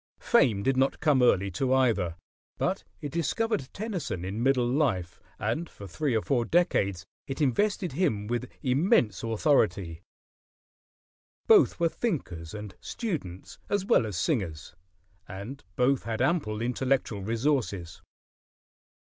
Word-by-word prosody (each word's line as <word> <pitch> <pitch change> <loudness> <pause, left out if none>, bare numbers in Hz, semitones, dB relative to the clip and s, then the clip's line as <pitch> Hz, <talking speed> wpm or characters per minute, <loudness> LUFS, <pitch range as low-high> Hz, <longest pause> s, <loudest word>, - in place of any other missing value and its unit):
Fame 115 - +3
did 135 +2 +1
not 135 +1 +2
come 150 -4 +3
early 100 -5 +3
to 130 +9 -1
either; 115 -10 +2 0.4
but - - -1 0.2
it 145 - -5
discovered 170 - -1
Tennyson 180 - -4
in 100 +4 -3
middle 130 -1 +3
life, 115 - 0 0.2
and 115 +12 -2
for 100 - -11
three 135 - -1
or 110 - +1
four 125 -4 +1
decades 100 - +1 0.2
it 135 - -5
invested 180 - +1
him 135 - 0
with 120 +3 -3
immense 130 - +2
authority. 105 - +1 1.4
Both - - +5
were 170 - +3
thinkers 105 - -3
and 105 -2 -7
students 95 - -5
as 205 -1 0
well 200 - +3
as 100 -5 -4
singers, 90 - -2 0.5
and 105 +9 -8
both 130 +1 +2
had 115 -1 -3
ample 125 -7 0
intellectual 125 -3 0
resources. 110 - -1
125 Hz, 130 wpm, -28 LUFS, 100-150 Hz, 1.4 s, Both